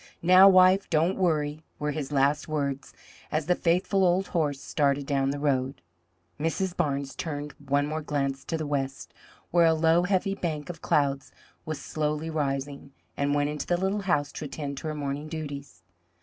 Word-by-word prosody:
Now, 185 +3 +8
wife, 185 +1 +5
don't 165 +3 +2
worry!" 155 -4 0
were 150 0 -2
his 145 -1 -4
last 145 +1 +2
words 140 -3 -2 0.4
as 155 -1 0
the 180 - +3
faithful 180 +3 +1
old 185 +2 +2
horse 150 -5 0
started 140 -1 0
down 135 -1 +1
the 140 - -2
road. 135 -2 0 0.6
Mrs. 175 +4 -1
Barnes 140 -4 -1
turned 150 -2 -5
one 140 +1 +1
more 155 +1 -3
glance 140 -2 -2
to 165 - -2
the 155 - -3
west, 135 -2 -3 0.4
where 170 -1 +5
a 160 - +4
low, 165 +2 +4
heavy 190 +1 +1
bank 165 -4 -3
of 165 - -14
clouds 140 -2 0 0.4
was 155 -2 -3
slowly 150 +2 -2
rising, 140 -2 -3 0.2
and 140 +1 0
went 145 0 +1
into 150 - -5
the 175 - +2
little 190 +3 -1
house 150 -7 0
to 155 - -6
attend 140 -1 -5
to - - -6
her 155 - -3
morning 145 +1 -4
duties. 145 -3 -7
150 Hz, 175 wpm, -27 LUFS, 140-170 Hz, 0.6 s, Now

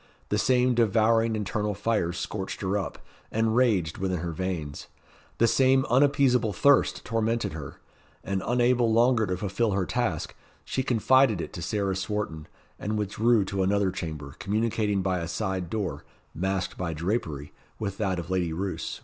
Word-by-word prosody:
The 105 - +1
same 125 +2 +3
devouring 115 0 +3
internal 105 0 -2
fire 105 -4 0
scorched 95 +2 -5
her 95 0 -1
up, 100 - -4 0.3
and 110 0 +1
raged 105 -11 +2
within 95 -1 -1
her 85 -1 -3
veins; 80 -4 -4 0.5
the 115 - +4
same 130 +2 +4
unappeasable 130 -4 +3
thirst 140 +8 +3
tormented 115 -3 -1
her; 75 -4 -8 0.4
and 100 -1 -2
unable 120 -1 +3
longer 115 -1 +3
to 90 0 -1
fulfil 100 +3 0
her 95 -1 0
task, - - -2 0.3
she 130 - -1
confided 130 -2 +3
it - - -5
to 85 - -6
Sarah 100 +1 -1
Swarton, 95 -5 -3 0.3
and 105 +1 -2
withdrew 105 +1 +2
to 100 0 -2
another 100 0 +2
chamber, 75 -6 -6
communicating 105 -1 0
by 95 -1 0
a 85 - -4
side 95 0 -3
door, 105 -3 -3 0.3
masked 95 +2 -2
by 85 -2 -2
drapery, 80 -5 -3 0.2
with 100 -2 -4
that 95 -4 0
of 85 +1 -5
Lady 90 -3 0
Roos. 95 +4 -4
105 Hz, 160 wpm, -27 LUFS, 90-115 Hz, 0.5 s, the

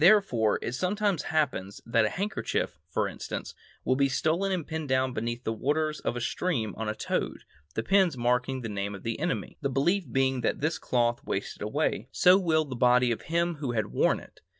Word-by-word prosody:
Therefore, 165 - +5
it - - -2
sometimes 190 - 0
happens 130 -11 0
that 115 -1 +3
a - - +1
handkerchief, 200 - -2
for - - 0
instance, - - -6 0.3
will 130 - +3
be 140 0 +3
stolen 165 +9 +1
and 180 -5 -1
pinned 160 -2 -4
down 130 -1 +2
beneath 120 +2 -3
the 110 - -1
waters 150 +6 0
of - - -2
a - - -2
stream 115 - -1
on 110 -1 -3
a 110 - -2
toad, - - -2 0.3
the 115 - -1
pins 190 - +3
marking 125 +2 +1
the 115 - -4
name 100 -1 -3
of 95 - -11
the 115 +2 -3
enemy, 170 +3 -2
the 140 - 0
belief 145 +3 +1
being 130 -1 +2
that 115 - +1
as - - -14
this 160 +4 0
cloth 120 -1 +1
wastes 100 - -4
away, 110 +1 -1
so 180 0 +6
will 160 -4 +2
the 130 -3 -6
body 125 0 +4
of 115 - -2
him 170 0 0
who 135 -5 -3
had 110 -3 -1
worn - - +3
it. - - -16
130 Hz, 210 wpm, -28 LUFS, 115-160 Hz, 0.3 s, so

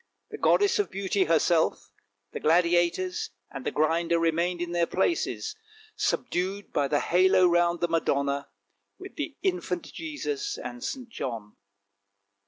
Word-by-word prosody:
The - - -7
goddess 405 0 +3
of 415 - +1
beauty 195 0 0
her 165 0 +4
self, 165 0 +1 0.4
the - - -5
Gladiators, 175 +2 +2 0.2
and 135 -2 -7
the - - 0
Grinder 165 +2 +1
remained 170 +2 +1
in 175 0 -3
their 170 -1 +1
places, 340 - -1 0.4
subdued 190 +3 -2
by 145 -1 +2
the 145 +1 +1
halo 185 +1 +4
round 175 0 +2
the 175 - +2
Madonna, 140 -4 0 0.5
with - - -11
the - - -5
infant 360 - -2
Jesus 410 +7 -4
and 245 +1 -7
St. 255 -2 -4
John. 115 - -6
175 Hz, 140 wpm, -27 LUFS, 165-200 Hz, 0.5 s, her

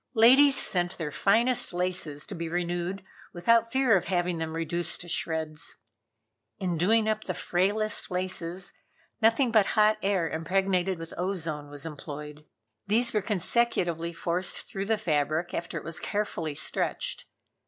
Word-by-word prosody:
Ladies 265 +5 +7
sent 175 -7 0
their 150 -3 -4
finest 230 - +3
laces 175 -5 -1
to 205 - -5
be 165 -2 -4
renewed 175 +2 -2 0.3
without 230 +6 +3
fear 260 -4 +4
of 180 - +1
having 175 -2 0
them 160 0 -3
reduced 170 +1 -2
to 175 - -7
shreds. 160 -2 -2 0.8
In 180 -3 -1
doing 215 +7 +3
up 215 0 -1
the 185 - -3
frailest 205 +5 0
laces, 180 -1 -2 0.5
nothing 230 +3 +4
but 215 -3 +4
hot 215 0 +5
air 190 -4 +1
impregnated 185 +3 0
with 165 0 -7
ozone 165 -6 -3
was 145 +1 -7
employed. 150 -1 -8 0.4
These 235 +3 +2
were 210 - +2
consecutively 180 -4 0
forced 175 +2 -2
through 195 0 -4
the 220 0 +2
fabric 155 -3 0
after 170 0 -3
it - - -6
was 165 +1 -5
carefully 170 -7 -2
stretched. - - -2
180 Hz, 145 wpm, -28 LUFS, 165-210 Hz, 0.8 s, Ladies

